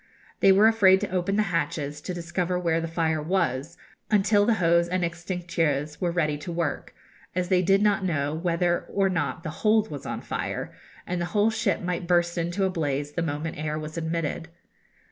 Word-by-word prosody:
They 195 Hz, -, +6 dB
were 200 Hz, +3 st, +6 dB
afraid 195 Hz, -4 st, +5 dB
to 205 Hz, -, -3 dB
open 185 Hz, +2 st, 0 dB
the 215 Hz, -, +3 dB
hatches, 150 Hz, -2 st, -2 dB
to 185 Hz, -, -5 dB
discover 175 Hz, +1 st, -2 dB
where 165 Hz, -2 st, 0 dB
the 165 Hz, -, -3 dB
fire 160 Hz, -1 st, 0 dB
was, 165 Hz, -2 st, -1 dB, 0.3 s
until 205 Hz, 0 st, +3 dB
the 230 Hz, -, +4 dB
hose 170 Hz, -2 st, +3 dB
and 180 Hz, 0 st, 0 dB
extincteurs 165 Hz, -4 st, -2 dB
were 175 Hz, -, +1 dB
ready 155 Hz, -4 st, 0 dB
to 160 Hz, +4 st, -6 dB
work, 165 Hz, -3 st, -3 dB, 0.4 s
as 180 Hz, -1 st, -1 dB
they 185 Hz, -2 st, +4 dB
did 195 Hz, +3 st, +3 dB
not 205 Hz, -2 st, +2 dB
know 150 Hz, -5 st, 0 dB
whether 175 Hz, +1 st, 0 dB
or 195 Hz, -1 st, +1 dB
not 165 Hz, -4 st, -2 dB
the 160 Hz, -, -4 dB
hold 220 Hz, 0 st, +3 dB
was 145 Hz, -2 st, -6 dB
on -, -, -4 dB
fire, -, -, -4 dB, 0.3 s
and 180 Hz, -1 st, -2 dB
the -, -, 0 dB
whole 210 Hz, +2 st, +4 dB
ship 220 Hz, -, 0 dB
might 180 Hz, -1 st, -3 dB
burst 175 Hz, -1 st, +2 dB
into 175 Hz, +3 st, -1 dB
a -, -, +1 dB
blaze 145 Hz, -4 st, -2 dB
the 170 Hz, -, -2 dB
moment 155 Hz, 0 st, -3 dB
the -, -, -5 dB
air 155 Hz, 0 st, -2 dB
was 155 Hz, 0 st, -6 dB
admitted. 165 Hz, 0 st, -2 dB
170 Hz, 200 wpm, -26 LUFS, 160-185 Hz, 0.4 s, They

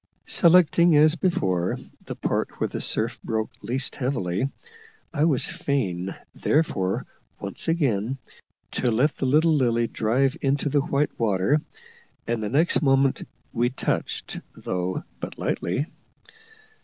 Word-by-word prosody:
Selecting, 170 Hz, -1 st, +5 dB
as 155 Hz, +1 st, +6 dB
before, 95 Hz, -, 0 dB, 0.3 s
that -, -, -5 dB
part -, -, -1 dB
where -, -, +1 dB
the -, -, -5 dB
surf -, -, +1 dB
broke 110 Hz, -1 st, -2 dB
least 130 Hz, +3 st, -2 dB
heavily, 125 Hz, -4 st, -1 dB, 0.6 s
I 150 Hz, -1 st, +2 dB
was 145 Hz, -6 st, +2 dB
fain 95 Hz, -10 st, -2 dB, 0.2 s
therefore 95 Hz, -12 st, 0 dB, 0.3 s
once -, -, -4 dB
again 135 Hz, -, +1 dB, 0.5 s
to 125 Hz, -, 0 dB
let 125 Hz, +7 st, +3 dB
the 135 Hz, -, -1 dB
little 155 Hz, +4 st, +4 dB
Lily 120 Hz, -5 st, +2 dB
drive 130 Hz, +6 st, +1 dB
into 140 Hz, +1 st, +1 dB
the 145 Hz, +1 st, +2 dB
white 145 Hz, +1 st, -1 dB
water, 110 Hz, +6 st, +2 dB, 0.6 s
and 115 Hz, -1 st, -1 dB
the 105 Hz, -, -2 dB
next 155 Hz, +8 st, +2 dB
moment 135 Hz, -2 st, +2 dB, 0.3 s
we 120 Hz, 0 st, +2 dB
touched, 130 Hz, -, -3 dB, 0.2 s
though 90 Hz, 0 st, -3 dB, 0.2 s
but -, -, -6 dB
lightly. 95 Hz, +12 st, -1 dB
135 Hz, 130 wpm, -25 LUFS, 110-150 Hz, 0.6 s, as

